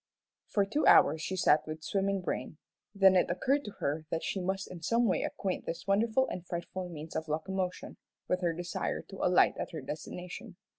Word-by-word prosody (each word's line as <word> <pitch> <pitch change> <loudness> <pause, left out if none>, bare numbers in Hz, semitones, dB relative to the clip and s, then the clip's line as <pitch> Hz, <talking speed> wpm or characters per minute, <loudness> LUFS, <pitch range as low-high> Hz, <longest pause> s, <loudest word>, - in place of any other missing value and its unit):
For 200 -2 +2
two 255 +10 0
hours 155 +2 +6
she 190 - -2
sat 155 -4 +3
with 155 0 -6
swimming 195 +1 0
brain, 165 -3 -4 0.4
then 195 -1 +6
it 180 - +3
occurred 265 +11 +1
to 210 - -6
her 155 +2 -2
that 165 - -2
she 190 - -2
must 190 +2 -2
in 175 -2 -8
some 235 +8 +2
way 195 - +2
acquaint 190 -2 -3
this 165 - -4
wonderful 220 +6 +2
and 180 - -5
frightful 175 +1 -5
means 160 -1 -8
of 160 - -2
locomotion, 180 +4 -3 0.3
with 180 0 0
her 175 -2 +2
desire 175 +1 -3
to 195 - -11
alight 180 0 +5
at - - -4
her 160 - -4
destination. 180 - -7
180 Hz, 195 wpm, -31 LUFS, 165-195 Hz, 0.4 s, hours